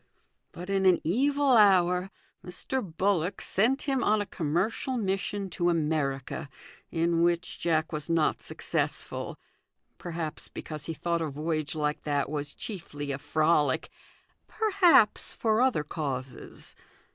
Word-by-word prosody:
But 180 +3 -7
in 195 -1 +3
an 180 -2 +5
evil 280 - +2
hour 185 -3 +5 0.3
Mr. 180 +9 -3
Bullock 185 0 0
sent 240 +8 +1
him 270 -3 0
on 215 +1 +3
a 205 - -1
commercial 190 - -1
mission 195 -1 -1
to 175 -1 +1
America, 150 -4 -1 0.4
in 165 0 +1
which 170 +1 +1
Jack 160 -1 +1
was 155 0 -4
not 165 -2 +2
successful - - -3 0.6
perhaps 165 -2 -5
because 155 -2 -7
he 165 - -3
thought 170 +1 -1
a 160 - -1
voyage 155 +1 -2
like 150 -1 -1
that 145 -1 -1
was 145 -1 -3
chiefly 145 -8 -6
a 140 - -3
frolic; 155 -2 +1 0.6
perhaps 380 - +4
for 220 0 +2
other 255 - +2
causes. 135 -4 -5
170 Hz, 130 wpm, -28 LUFS, 155-200 Hz, 0.6 s, an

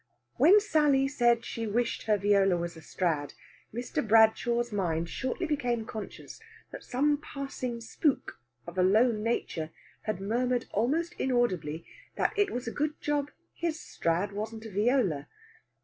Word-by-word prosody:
When 350 +10 +7
Sally 300 -8 +3
said 240 -4 +2
she 230 -1 -4
wished 230 +2 -1
her 210 -1 +4
viola 200 -2 +3
was 170 0 -4
a 160 - -11
Strad, 155 -3 -2 0.4
Mr. 240 +3 -2
Bradshaw's 225 +2 +4
mind 170 -5 -1
shortly 260 - -2
became 245 -7 -1
conscious 220 -2 -8 0.3
that - - -8
some 290 +3 +1
passing 270 -5 -5
spook, 275 +5 -1 0.3
of 170 +2 -5
a - - +5
low 215 +7 +5
nature, 210 -7 -2 0.4
had 215 -4 -2
murmured 240 +5 0
almost 310 - 0
inaudibly 185 - 0 0.3
that - - +1
it 410 -1 +2
was 245 -1 -4
a - - -1
good 300 +3 -2
job 290 -1 -1 0.2
his 330 -2 -2
Strad 175 +5 -1
wasn't 220 +2 -5
a 220 - -7
viola. 205 - +1
230 Hz, 150 wpm, -29 LUFS, 200-270 Hz, 0.4 s, When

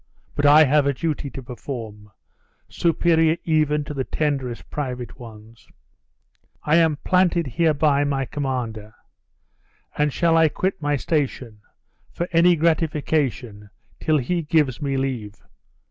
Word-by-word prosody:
But 145 - +1
I 150 +2 +8
have 145 0 +3
a 140 - 0
duty 155 -1 -3
to 135 - -9
perform, 115 -4 -8 0.6
superior 165 -1 +2
even 150 -2 +1
to 150 +1 -7
the 135 -2 -2
tenderest 135 -5 -3
private 125 -4 -5
ones. 115 -1 -13 1.0
I 150 +2 +3
am 160 -3 +3
planted 180 -2 +2
hereby 150 0 +2
my 135 -2 -1
commander; 120 -7 -4 1.0
and 150 0 +1
shall 165 +2 +2
I 160 -1 +5
quit 190 +4 -2
my 145 0 0
station, 130 -7 -2 0.5
for 175 - -3
any 170 +1 +5
gratification, 150 - -1 0.3
till 155 -1 +1
he 170 +6 -1
gives 150 -4 0
me 135 -2 -1
leave? 125 -6 -3
145 Hz, 130 wpm, -22 LUFS, 125-160 Hz, 1.0 s, I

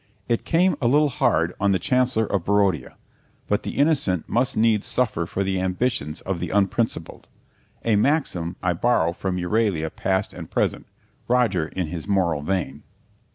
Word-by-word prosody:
It 115 - -1
came 180 +2 +3
a 120 - +2
little 145 +4 +4
hard 120 - +1
on 100 0 +2
the - - +3
Chancellor 125 +3 +1
of 100 -4 -1
Barodia, 100 -8 +1 0.5
but - - 0
the - - -6
innocent 135 - +2
must 125 +4 0
needs 110 -2 +2
suffer 105 -9 0
for 100 - -2
the 95 -1 -1
ambitions 90 - -1
of 95 -2 -3
the 90 - -3
unprincipled 100 +3 -1 0.6
a 115 -2 +3
maxim 100 - 0
I 90 -1 +2
borrow 85 -3 +1
from 90 0 -3
Euralia 90 -3 0
Past 95 +1 -1
and - - -9
Present; - - -1 0.4
Roger 115 -10 +2
in 90 +1 -3
his 80 +2 -6
moral 90 -7 +1
vein. 75 -4 -2
100 Hz, 160 wpm, -23 LUFS, 90-120 Hz, 0.6 s, little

